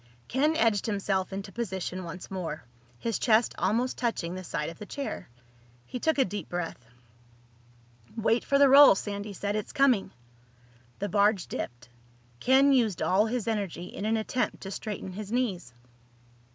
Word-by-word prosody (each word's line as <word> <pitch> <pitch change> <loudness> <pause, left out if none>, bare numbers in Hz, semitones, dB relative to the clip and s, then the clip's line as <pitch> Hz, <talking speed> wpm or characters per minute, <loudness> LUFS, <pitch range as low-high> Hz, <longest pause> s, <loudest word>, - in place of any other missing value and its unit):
Ken 300 +5 +2
edged 225 - +2
himself 195 -3 -1
into 195 +1 -5
position 190 -4 -4
once 175 +2 -8
more, 165 -5 -4 0.3
his 230 - -2
chest 225 0 +3
almost 245 +4 0
touching 225 -8 -1
the 185 0 -6
side 150 -3 -3
of 165 - -11
the 210 - -7
chair. 280 - -5 0.6
He 250 - -6
took 320 +4 +1
a 270 - +4
deep 195 -3 -6
breath. 165 -9 -5 1.3
"Wait 225 +1 +2
for 280 - +2
the 280 0 +7
roll," 275 -3 +9
Sandy 205 +1 -4
said. 200 +1 -3
"It's 215 - -3
coming." 260 -9 +3 0.9
The 205 - -2
barge 205 0 +3
dipped. 120 +1 -6 0.5
Ken 270 - +5
used 225 -8 +2
all 205 +4 +3
his 235 -1 -2
energy 200 -6 -2
in 195 - -6
an 225 +1 +2
attempt 245 +3 -2
to 195 - -6
straighten 200 -2 -5
his 205 +2 -7
knees. 205 - -1
205 Hz, 160 wpm, -28 LUFS, 185-240 Hz, 1.3 s, roll